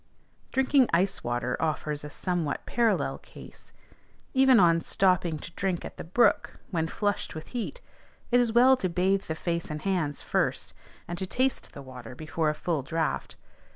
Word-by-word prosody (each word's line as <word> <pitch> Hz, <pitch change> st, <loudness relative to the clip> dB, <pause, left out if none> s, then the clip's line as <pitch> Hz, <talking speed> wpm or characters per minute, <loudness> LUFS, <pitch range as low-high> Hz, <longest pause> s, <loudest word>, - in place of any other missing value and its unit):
Drinking 265 Hz, -1 st, +3 dB
ice 190 Hz, +3 st, +1 dB
water 120 Hz, +1 st, -1 dB
offers 150 Hz, -2 st, -2 dB
a 150 Hz, -, -6 dB
somewhat 170 Hz, -2 st, -2 dB
parallel 235 Hz, -2 st, +1 dB
case; -, -, -14 dB, 0.6 s
even 265 Hz, -2 st, +6 dB
on 165 Hz, -2 st, +5 dB
stopping 180 Hz, -4 st, +2 dB
to 160 Hz, -, -9 dB
drink 185 Hz, -1 st, -2 dB
at -, -, -9 dB
the -, -, -6 dB
brook, 185 Hz, +9 st, +2 dB
when 165 Hz, -3 st, 0 dB
flushed 205 Hz, +1 st, -2 dB
with 155 Hz, -, -8 dB
heat, 250 Hz, -, -4 dB, 0.5 s
it 245 Hz, -, +5 dB
is 240 Hz, -2 st, +2 dB
well 250 Hz, +3 st, +6 dB
to 185 Hz, -, -1 dB
bathe 190 Hz, +3 st, +1 dB
the 160 Hz, -, -3 dB
face 170 Hz, 0 st, -2 dB
and 155 Hz, 0 st, -5 dB
hands 170 Hz, -7 st, -1 dB
first, -, -, -1 dB, 0.3 s
and 175 Hz, 0 st, -5 dB
to 190 Hz, -, -3 dB
taste 255 Hz, +5 st, 0 dB
the 140 Hz, -, -9 dB
water 125 Hz, -2 st, -10 dB
before 155 Hz, +2 st, -1 dB
a 150 Hz, -, -1 dB
full 160 Hz, -2 st, -1 dB
draught. 160 Hz, +4 st, -2 dB
175 Hz, 170 wpm, -28 LUFS, 155-205 Hz, 0.6 s, even